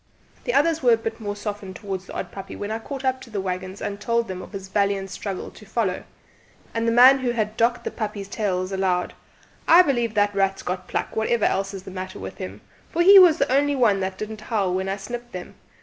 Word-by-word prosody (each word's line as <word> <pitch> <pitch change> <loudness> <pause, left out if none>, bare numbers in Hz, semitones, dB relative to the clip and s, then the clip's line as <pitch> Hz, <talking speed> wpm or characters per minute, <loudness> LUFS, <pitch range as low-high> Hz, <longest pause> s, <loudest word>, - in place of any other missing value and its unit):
The - - 0
others 325 +2 +3
were 245 -3 +5
a - - +4
bit 225 0 -5
more 205 -2 -4
softened 205 -2 -6
towards 195 -1 -5
the - - -9
odd - - -4
puppy 195 -1 -8
when 205 +1 -5
I 220 - -2
caught 270 +3 -6
up 260 0 0
to - - -12
the 210 -3 -3
waggons 185 +1 -4
and 200 0 -4
told 235 +2 0
them 185 -1 -5
of - - -11
his 195 -2 -7
valiant 195 -1 0
struggle 195 0 -5
to - - -15
follow; 210 -3 -2 0.7
and 230 0 -1
the - - +3
man 255 +3 +8
who 255 -1 -1
had 215 -2 -1
docked 235 +2 +1
the - - -3
puppies' 210 -3 -4
tails 190 -3 -2
allowed, 190 -2 0 0.5
"I 350 +2 +8
believe 240 -7 0
the 205 0 +4
rat's 195 -1 0
got 180 0 -4
pluck, - - -3
whatever 220 0 +1
else 195 +1 0
is 190 - -8
the 190 - -9
matter 185 0 -6
with 95 0 -8
him, 95 +3 -7 0.3
for 345 - +1
he 390 +2 +10
was 350 -4 +7
the 275 - 0
only 285 +1 +2
one 225 -7 +3
that 190 0 -3
didn't 215 +1 -6
howl 205 -5 -1
when 190 +1 -1
I 195 - 0
snipped 240 +4 -7
them. 180 -1 -7
205 Hz, 240 wpm, -24 LUFS, 190-235 Hz, 0.7 s, he